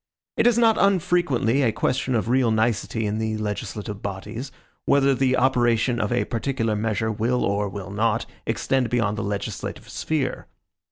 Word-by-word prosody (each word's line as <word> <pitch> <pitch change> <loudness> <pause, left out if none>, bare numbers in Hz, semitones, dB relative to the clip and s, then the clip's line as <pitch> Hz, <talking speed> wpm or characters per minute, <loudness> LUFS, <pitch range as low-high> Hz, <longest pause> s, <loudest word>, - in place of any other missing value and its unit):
It - - +3
is 240 -1 +4
not 225 -2 +4
unfrequently 175 - +2
a 120 -5 +3
question 130 +2 0
of 115 - 0
real 125 0 +3
nicety 110 0 0
in 105 +1 -1 0.2
legislative 105 0 -4
bodies, 105 +7 -5 0.3
whether 140 -1 +4
the 130 0 +2
operation 120 -2 +2
of 105 - -1
a 120 - +1
particular 115 -2 -1
measure 110 +1 -1
will, 120 +4 0
or 100 0 0
will 95 0 -7
not, 110 +3 0 0.2
extend 130 -3 0
beyond 110 -4 +1
the 115 - -3
legislative 100 -1 -4
sphere. 145 -5 -2
115 Hz, 155 wpm, -24 LUFS, 105-130 Hz, 0.3 s, is